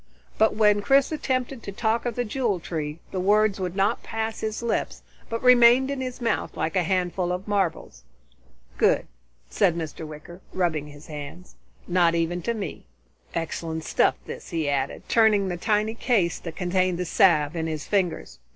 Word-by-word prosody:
But 220 0 +4
when 210 -1 +4
Chris 275 +7 +3
attempted 260 -4 -2
to 200 - -7
talk 225 +3 0
of 235 - -3
the 245 - -1
Jewel 220 -4 -1
Tree, 155 -2 -4
the 190 - -2
words 205 +1 +3
would 180 -1 -3
not 200 +4 +1
pass 225 0 -4
his 220 +1 -3
lips 235 - -2 0.3
but 230 0 -3
remained 250 +2 +6
in 275 -2 -3
his 255 -1 -5
mouth 230 -3 -2
like 165 - -2
a 185 - +3
handful 180 0 0
of 180 +3 -4
marbles. 190 - -1 0.8
"Good," - - +3 0.5
said 185 -5 +2
Mr. 160 -1 -5
Wicker, 155 +4 -11
rubbing 160 -5 0
his 145 0 -13
hands. 150 +4 -9 0.3
"Not 175 -2 +3
even 170 +1 -1
to 235 +6 -2
me. 205 -3 -6 0.5
Excellent 160 -1 -3
stuff, - - +2
this," - - -8
he 160 -3 -2
added, 140 -1 -2
turning 210 -4 +3
the 175 - -2
tiny 215 +3 +1
case 220 -7 +1
that 165 -2 -7
contained 185 0 0
the 180 - -2
salve 165 -3 +3
in 165 -1 -2
his 155 -2 -4
fingers. 175 - -1
185 Hz, 175 wpm, -25 LUFS, 165-220 Hz, 0.8 s, remained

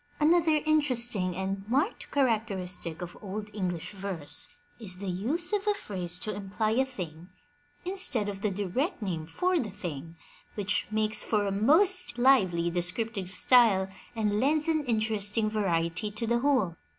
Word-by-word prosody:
Another 315 -1 +3
interesting 245 - +1
and 195 +1 -3
marked 285 - 0
characteristic 195 - -1
of 175 - -8
Old 210 +1 -6
EngUsh 180 -5 -3
verse 195 - -1 0.3
is 190 -5 -7
the 200 - -7
use 300 - -2
of 415 0 0
a 415 - +3
phrase 180 - -3
to 215 - -2
imply 205 +2 -2
a 260 +4 +2
thing 175 -9 -8 0.6
instead 360 - +2
of 200 -1 -5
the 210 - +1
direct 210 - -2
name 165 -5 -3
for 360 - 0
the 220 - -3
thing, 170 -5 -7 0.4
which 205 -2 -1
makes 215 0 0
for 210 -2 0
a 200 - -1
most 320 - +4
lively 185 -10 +3
descriptive 185 +3 -1
style 200 -2 +4 0.3
and 210 -2 0
lends 300 +5 +2
an 315 -2 +1
interesting 215 -2 +1
variety 175 -1 0
to 215 +3 -4
the 235 +1 +1
whole. 245 - +1
210 Hz, 150 wpm, -28 LUFS, 185-260 Hz, 0.6 s, most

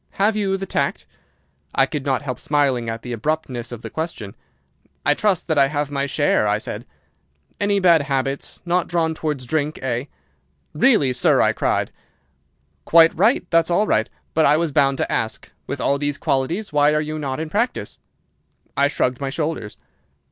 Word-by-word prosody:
Have 210 +2 +2
you 195 -2 0
the 195 - -5
tact?' - - -2 0.7
"I 135 - +5
could 145 -1 -4
not 135 -1 0
help 125 -3 -4
smiling 135 -6 +1
at 115 0 -5
the 125 - -5
abruptness 125 -1 -3
of 120 -2 -8
the - - -5
question. 160 - -5 0.7
"'I 145 - +5
trust 195 +2 0
that 160 -3 +2
I 135 - +5
have 145 0 -2
my 140 0 -1
share,' 140 -5 +2
I 105 0 +2
said. 110 - -6 0.7
"'Any 205 0 +2
bad 170 -4 +5
habits? 135 -1 -3
Not 175 0 +1
drawn 165 -2 0
towards 150 -5 -3
drink, 150 +3 -1
eh?' 125 0 -1 0.7
"'Really, 150 - +3
sir!' - - +3
I - - +3
cried. - - 0 0.9
"'Quite 165 0 +6
right! 215 - +3
That's 165 0 +3
all 190 +5 +2
right! 110 - +1 0.2
But 160 - +4
I 150 +2 +4
was 165 -1 0
bound 140 -1 +2
to - - -2
ask. 110 0 -3 0.2
With - - -4
all 140 0 +1
these 145 0 -1
qualities, 165 +9 -1
why 150 +1 +4
are - - +3
you 155 0 -4
not 135 -2 -3
in 160 -1 -5
practice?' 230 +6 -2 0.8
"I 140 - +3
shrugged 130 -3 -1
my 135 - -2
shoulders. 150 - -3
145 Hz, 180 wpm, -21 LUFS, 135-165 Hz, 0.9 s, Quite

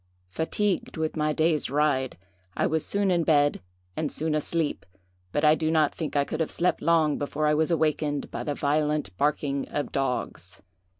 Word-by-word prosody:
"Fatigued 190 - -1
with 160 0 -2
my 155 -1 +1
day's 155 0 +1
ride, 135 -2 +1 0.4
I - - +2
was 160 0 0
soon 200 -1 +1
in 170 -2 +2
bed, 145 -3 +3 0.3
and 155 -2 -2
soon 160 0 -1
asleep, 155 +1 -1 0.5
but 145 - +1
I 150 - +7
do 155 0 0
not 155 -2 +3
think 160 -3 -5
I 145 - +4
could 155 - -4
have 160 - 0
slept 180 +1 0
long 160 -2 +3
before 145 +1 -2
I 150 - +4
was 155 +2 +2
awakened 155 -3 0
by - - -4
the 145 - -2
violent 150 -8 0
barking 140 -1 0
of 145 - -3
dogs. 135 -2 -2
150 Hz, 180 wpm, -26 LUFS, 145-160 Hz, 0.5 s, I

